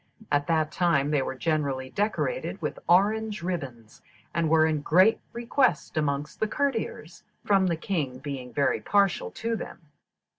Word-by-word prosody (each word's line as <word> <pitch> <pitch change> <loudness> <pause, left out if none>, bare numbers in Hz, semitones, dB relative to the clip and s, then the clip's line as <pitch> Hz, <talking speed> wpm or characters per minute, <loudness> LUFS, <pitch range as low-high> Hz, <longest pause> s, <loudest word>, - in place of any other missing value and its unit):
At 145 0 +1
that 155 -2 +1
time 150 -4 +2
they 145 -2 +2
were 130 - -3
generally 140 -3 -1
decorated 220 - -1
with - - -4
orange 210 +2 +2
ribbons, 135 -11 -5 0.3
and 170 -2 +1
were 160 0 +5
in 155 -2 0
great 185 +9 +4
request 235 - 0
amongst 150 -1 -2
the 220 - +1
courtiers, 220 - -3 0.2
from 195 -2 +3
the 170 -2 0
king 155 -8 -2
being 135 -2 -6
very 140 - +1
partial 200 -2 +2
to 230 0 -3
them. - - -7
165 Hz, 150 wpm, -27 LUFS, 145-205 Hz, 0.3 s, were